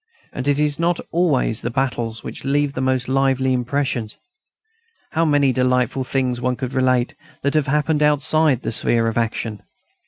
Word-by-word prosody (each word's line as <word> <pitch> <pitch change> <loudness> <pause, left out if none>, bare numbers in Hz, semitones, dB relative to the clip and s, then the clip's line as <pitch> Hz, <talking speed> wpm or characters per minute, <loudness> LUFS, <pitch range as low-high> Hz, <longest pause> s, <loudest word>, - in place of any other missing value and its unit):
And 130 +1 -4
it 145 -1 +3
is 150 0 +1
not 170 +1 +1
always 150 -10 +1
the 120 - -2
battles 120 -3 -2
which - - -7
leave 140 +1 +1
the 130 - -3
most 130 -1 0
lively 135 0 +1
impressions. 125 -3 -2 0.9
How 165 0 +1
many 145 -3 +3
delightful 125 0 +1
things 125 -2 -1
one 125 0 0
could 130 0 -5
relate 130 -1 +1 0.3
that 140 - +1
have 155 -2 +1
happened 150 +2 +1
outside 150 -2 +2
the - - -2
sphere 115 0 +1
of 115 - -2
action! 115 -2 -2
130 Hz, 165 wpm, -21 LUFS, 125-145 Hz, 0.9 s, it